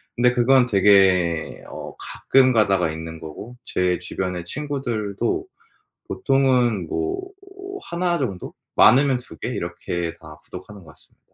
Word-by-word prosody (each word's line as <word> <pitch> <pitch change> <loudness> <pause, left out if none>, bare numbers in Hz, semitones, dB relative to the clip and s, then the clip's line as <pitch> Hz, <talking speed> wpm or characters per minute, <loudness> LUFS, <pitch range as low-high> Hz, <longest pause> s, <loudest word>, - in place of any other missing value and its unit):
그런데 125 0 +3
그건 125 +1 +4
되게 95 -5 +3
어 - - -9
가끔 130 -1 +2
가다가 95 -7 +2
있는 80 0 -7
거고 90 +11 -9
제 90 -1 0
주변의 90 0 -4
친구들도 120 - -3 0.6
보통은 125 -4 +1
뭐 80 - -3 0.6
1 175 0 0
정도? 105 - -4 0.2
많으면 135 +1 +5
2 100 -10 -12
개? - - -4
이렇게 85 -1 -4
다 75 -1 -12
구독하는 95 +2 -11
것 80 - -13
같습니다. - - -26
100 Hz, 255 characters per minute, -22 LUFS, 90-130 Hz, 0.6 s, 많으면